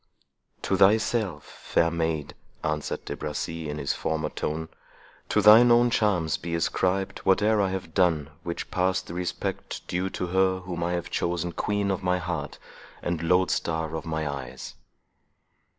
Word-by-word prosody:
"To 95 Hz, -, +1 dB
thyself, 105 Hz, +1 st, +3 dB
fair 85 Hz, 0 st, 0 dB
maid," 80 Hz, -3 st, -2 dB, 0.3 s
answered 75 Hz, -1 st, -2 dB
De -, -, -4 dB
Bracy, 75 Hz, +1 st, -4 dB
in 75 Hz, -, -4 dB
his 70 Hz, -2 st, -1 dB
former 80 Hz, -1 st, -2 dB
tone—"to 80 Hz, +6 st, -4 dB
thine 110 Hz, +3 st, +9 dB
own 120 Hz, 0 st, +5 dB
charms 90 Hz, -9 st, +1 dB
be 85 Hz, -1 st, -4 dB
ascribed 95 Hz, +3 st, 0 dB
whate'er 105 Hz, +3 st, +3 dB
I 95 Hz, -, +1 dB
have 95 Hz, -3 st, -5 dB
done 80 Hz, -6 st, +2 dB
which 85 Hz, 0 st, -5 dB
passed 95 Hz, 0 st, +1 dB
the -, -, -8 dB
respect 90 Hz, 0 st, -4 dB
due 95 Hz, +2 st, -1 dB
to 90 Hz, -, -3 dB
her, 95 Hz, +1 st, +2 dB
whom 90 Hz, -2 st, -4 dB
I 85 Hz, +1 st, 0 dB
have 85 Hz, -1 st, -3 dB
chosen 85 Hz, 0 st, -1 dB
queen 100 Hz, +2 st, -1 dB
of 95 Hz, -, -2 dB
my 90 Hz, 0 st, +1 dB
heart, 80 Hz, -5 st, -4 dB, 0.5 s
and 85 Hz, -2 st, -1 dB
lodestar 80 Hz, -2 st, +1 dB
of 80 Hz, -, -5 dB
my 80 Hz, -1 st, -2 dB
eyes." 65 Hz, -2 st, -6 dB
85 Hz, 150 wpm, -26 LUFS, 80-95 Hz, 0.5 s, thine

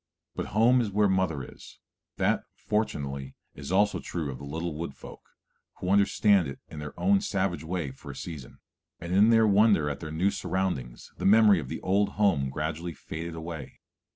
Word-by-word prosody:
But -, -, -3 dB
home 125 Hz, +3 st, +5 dB
is 110 Hz, -, -1 dB
where 105 Hz, +1 st, +3 dB
mother 95 Hz, -7 st, 0 dB
is, -, -, -13 dB, 0.4 s
that, -, -, +1 dB
fortunately, 70 Hz, -10 st, -3 dB, 0.2 s
is 70 Hz, +3 st, -8 dB
also 105 Hz, +2 st, +3 dB
true 80 Hz, -5 st, -4 dB
of 65 Hz, -, -8 dB
the -, -, -10 dB
little 80 Hz, +3 st, -4 dB
Wood 75 Hz, -2 st, -5 dB
Folk, -, -, -12 dB, 0.5 s
who 90 Hz, -, -3 dB
understand 100 Hz, -2 st, +4 dB
it 70 Hz, -, -7 dB
in 75 Hz, -, -8 dB
their 75 Hz, 0 st, -8 dB
own 200 Hz, 0 st, +3 dB
savage 95 Hz, -, -1 dB
way 80 Hz, -4 st, -3 dB
for 65 Hz, -, -12 dB
a -, -, -7 dB
season, 75 Hz, -7 st, -8 dB, 0.4 s
and 85 Hz, +2 st, -5 dB
in 105 Hz, +4 st, +6 dB
their 115 Hz, -1 st, +5 dB
wonder 100 Hz, -7 st, +4 dB
at 70 Hz, -, -6 dB
their 80 Hz, -, -6 dB
new 85 Hz, +6 st, +1 dB
surroundings 90 Hz, -11 st, -3 dB
the -, -, -4 dB
memory 105 Hz, -2 st, +6 dB
of 65 Hz, -, -7 dB
the -, -, -5 dB
old 100 Hz, +2 st, +1 dB
home 95 Hz, -11 st, +2 dB
gradually 80 Hz, +4 st, -4 dB
faded 80 Hz, +3 st, -6 dB
away. 80 Hz, -3 st, -7 dB
85 Hz, 185 wpm, -28 LUFS, 75-100 Hz, 0.5 s, in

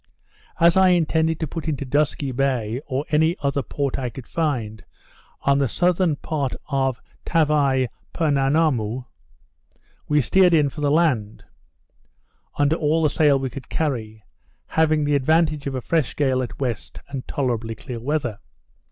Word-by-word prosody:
As 170 Hz, 0 st, +5 dB
I 190 Hz, 0 st, +6 dB
intended 160 Hz, -2 st, +2 dB
to 160 Hz, -, -1 dB
put 165 Hz, 0 st, -6 dB
into 145 Hz, -3 st, -2 dB
Dusky 140 Hz, 0 st, 0 dB
Bay, 125 Hz, -3 st, -1 dB
or 135 Hz, +1 st, -2 dB
any 160 Hz, +3 st, +3 dB
other 140 Hz, 0 st, +1 dB
port 140 Hz, -1 st, -3 dB
I 125 Hz, -2 st, -2 dB
could 120 Hz, +1 st, -10 dB
find, 115 Hz, -, -2 dB, 0.6 s
on 140 Hz, 0 st, +2 dB
the 140 Hz, -, +2 dB
southern 175 Hz, -, +1 dB
part 145 Hz, -3 st, -3 dB, 0.2 s
of 135 Hz, -3 st, 0 dB, 0.2 s
Tavai 145 Hz, -5 st, +2 dB, 0.2 s
Poenammoo, 135 Hz, -6 st, +1 dB, 1.0 s
we 150 Hz, 0 st, +3 dB
steered 180 Hz, +7 st, +4 dB
in 150 Hz, -3 st, +3 dB
for 150 Hz, -, -8 dB
the 145 Hz, -, +2 dB
land, 140 Hz, -10 st, +1 dB, 1.1 s
under 145 Hz, +3 st, +2 dB
all 160 Hz, +1 st, +1 dB
the 150 Hz, -, +3 dB
sail 145 Hz, -3 st, +4 dB
we 135 Hz, -1 st, -3 dB
could 135 Hz, +1 st, -9 dB
carry, 110 Hz, -8 st, -3 dB, 0.5 s
having 155 Hz, -1 st, +2 dB
the 145 Hz, 0 st, +1 dB
advantage 155 Hz, +1 st, +2 dB
of 135 Hz, -, -3 dB
a 130 Hz, -, -2 dB
fresh 160 Hz, 0 st, 0 dB
gale 130 Hz, -3 st, +1 dB
at 125 Hz, -, -5 dB
W., 130 Hz, -3 st, 0 dB, 0.4 s
and 135 Hz, -2 st, -6 dB
tolerably 120 Hz, -4 st, -2 dB
clear 125 Hz, +1 st, -7 dB
weather. 125 Hz, -4 st, -2 dB
140 Hz, 150 wpm, -22 LUFS, 130-155 Hz, 1.1 s, I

